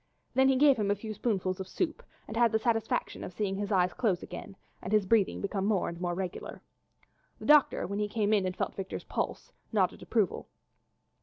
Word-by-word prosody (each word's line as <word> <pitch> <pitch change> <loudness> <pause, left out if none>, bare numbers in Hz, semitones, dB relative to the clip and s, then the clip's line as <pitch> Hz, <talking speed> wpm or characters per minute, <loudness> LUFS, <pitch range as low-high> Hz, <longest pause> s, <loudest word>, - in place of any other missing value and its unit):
Then 265 0 +4
he 265 - +4
gave 275 0 +5
him 205 -2 0
a 205 - +3
few 215 +2 -6
spoonfuls 190 -5 -1
of 190 - -5
soup 320 - -2 0.3
and 220 - -7
had 235 -1 +4
the 220 - +3
satisfaction 225 -1 -1
of - - -6
seeing 195 0 -1
his 205 +1 -3
eyes 180 -2 +3
close 200 -8 0
again 180 +2 -8 0.3
and 185 - -6
his 210 -2 +3
breathing 210 -1 +2
become 195 -1 -2
more 210 -4 +1
and 170 0 -6
more 175 -1 -1
regular. 185 -1 -5 0.7
The - - -10
doctor, 300 -2 +5
when 200 +2 -3
he 210 - 0
came 210 0 +1
in 200 -3 +3
and 185 - -4
felt - - -1
Victor's 190 -1 -5
pulse, - - -4 0.2
nodded - - +1
approval. - - 0
205 Hz, 210 wpm, -30 LUFS, 190-225 Hz, 0.7 s, gave